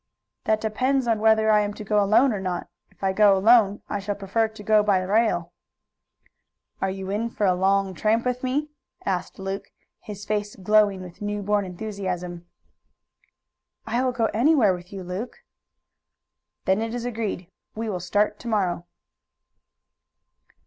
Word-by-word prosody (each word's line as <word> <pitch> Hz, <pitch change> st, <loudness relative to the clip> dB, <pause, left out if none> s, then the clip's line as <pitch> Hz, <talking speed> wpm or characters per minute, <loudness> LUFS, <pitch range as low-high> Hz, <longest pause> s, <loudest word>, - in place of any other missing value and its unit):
"That 220 Hz, 0 st, +2 dB
depends 255 Hz, +5 st, 0 dB
on 225 Hz, -2 st, +2 dB
whether 220 Hz, 0 st, +4 dB
I 210 Hz, -, +5 dB
am 205 Hz, 0 st, -1 dB
to -, -, -7 dB
go 210 Hz, 0 st, +2 dB
alone 220 Hz, +6 st, +4 dB
or 205 Hz, -, -3 dB
not. 185 Hz, -2 st, -3 dB, 0.2 s
If -, -, -21 dB
I 190 Hz, 0 st, +2 dB
go 200 Hz, -1 st, +5 dB
alone 210 Hz, 0 st, +4 dB
I 205 Hz, -, -2 dB
shall 200 Hz, +1 st, -3 dB
prefer 205 Hz, +3 st, 0 dB
to 220 Hz, -1 st, -12 dB
go 215 Hz, 0 st, +4 dB
by 205 Hz, -2 st, +3 dB
rail." 185 Hz, -4 st, +1 dB, 1.3 s
"Are 195 Hz, -, +1 dB
you 190 Hz, 0 st, -5 dB
in 220 Hz, +3 st, -1 dB
for 210 Hz, -, -1 dB
a 185 Hz, -, +4 dB
long 195 Hz, +1 st, +1 dB
tramp 220 Hz, +6 st, +1 dB
with 250 Hz, 0 st, -1 dB
me?" 285 Hz, +4 st, -1 dB, 0.3 s
asked 185 Hz, -2 st, -2 dB
Luke, 195 Hz, 0 st, -4 dB, 0.3 s
his 205 Hz, -1 st, -9 dB
face 210 Hz, -1 st, -2 dB
glowing 205 Hz, -1 st, +3 dB
with 180 Hz, +1 st, -12 dB
new 205 Hz, 0 st, -3 dB
born 205 Hz, 0 st, +1 dB
enthusiasm. 180 Hz, -3 st, -5 dB, 1.4 s
"I 235 Hz, +3 st, 0 dB
will 255 Hz, -, +1 dB
go 235 Hz, -2 st, 0 dB
anywhere 240 Hz, -3 st, +4 dB
with 180 Hz, 0 st, -9 dB
you, 195 Hz, -2 st, -6 dB
Luke." 205 Hz, -, -6 dB, 1.2 s
"Then 190 Hz, +3 st, +2 dB
it 225 Hz, +1 st, -3 dB
is 240 Hz, -1 st, -4 dB
agreed. 215 Hz, -6 st, -4 dB, 0.2 s
We 225 Hz, +1 st, -3 dB
will 190 Hz, -4 st, -2 dB
start 205 Hz, +4 st, 0 dB
to 245 Hz, -, -9 dB
morrow." 185 Hz, -6 st, 0 dB
205 Hz, 165 wpm, -24 LUFS, 190-220 Hz, 1.4 s, I